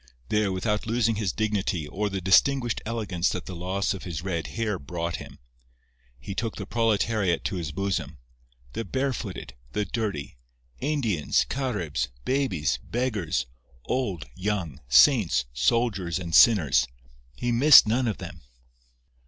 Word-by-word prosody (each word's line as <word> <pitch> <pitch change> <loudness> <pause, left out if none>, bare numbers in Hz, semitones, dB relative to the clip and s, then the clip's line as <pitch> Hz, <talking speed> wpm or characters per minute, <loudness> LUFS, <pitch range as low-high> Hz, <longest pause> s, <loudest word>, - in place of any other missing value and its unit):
There, 105 -2 +1
without 105 +3 -1
losing 115 -1 +1
his 105 -4 0
dignity 105 -7 -1
or 105 +7 -2
the 95 -1 -3
distinguished 120 +6 +3
elegance 105 -7 -1
that 90 - -4
the 95 - -7
loss 95 +4 -1
of 95 - -7
his 85 -2 -5
red 85 -4 -2
hair 110 -4 -2
brought 85 +4 -4
him, - - -11 0.8
he 65 +10 -7
took 115 +2 -3
the 100 - -6
proletariat 110 -4 +1
to 95 - -2
his 80 -4 -4
bosom—the 60 - -6
barefooted, 130 -7 -3 0.2
the 105 - 0
dirty, 100 - -4 0.4
Indians, 125 - 0
Caribs, 90 - -2 0.2
babies, 110 - 0
beggars, 105 - -2 0.4
old, 110 - -2
young, 90 -8 -3
saints, 85 - +5
soldiers 90 - +1
and 85 -3 -6
sinners—he 60 - +2
missed 130 0 +8
none 120 +3 +1
of 110 - -1
them. - - -9
100 Hz, 130 wpm, -26 LUFS, 80-115 Hz, 0.8 s, missed